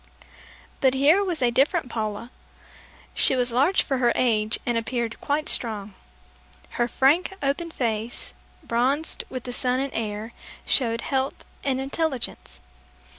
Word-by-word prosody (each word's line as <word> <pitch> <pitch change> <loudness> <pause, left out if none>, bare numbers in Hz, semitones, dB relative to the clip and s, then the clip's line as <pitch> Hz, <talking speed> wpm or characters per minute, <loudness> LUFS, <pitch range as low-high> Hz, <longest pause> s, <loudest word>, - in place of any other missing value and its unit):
But 265 -1 +3
here 300 +9 +5
was 345 -8 -1
a 240 - +3
different 280 +5 +2
Paula. 220 0 -4 0.8
She - - +4
was 250 -1 +1
large 280 +11 +3
for 270 -2 -1
her 240 -2 +4
age 220 -3 +2
and 240 - 0
appeared 230 0 -2
quite 300 +2 -1
strong. 210 -4 -2 0.9
Her 240 - +3
frank 295 +10 +3
open 285 +5 0
face, 230 -5 -3 0.3
bronzed 270 +4 +1
with 255 -2 -5
the 245 - -5
sun 250 +1 +1
and 275 0 -2
air, 215 +1 -4 0.3
showed 230 -3 +2
health 265 -1 -2 0.2
and 265 -2 0
intelligence. 270 - -3
255 Hz, 135 wpm, -25 LUFS, 230-275 Hz, 0.9 s, here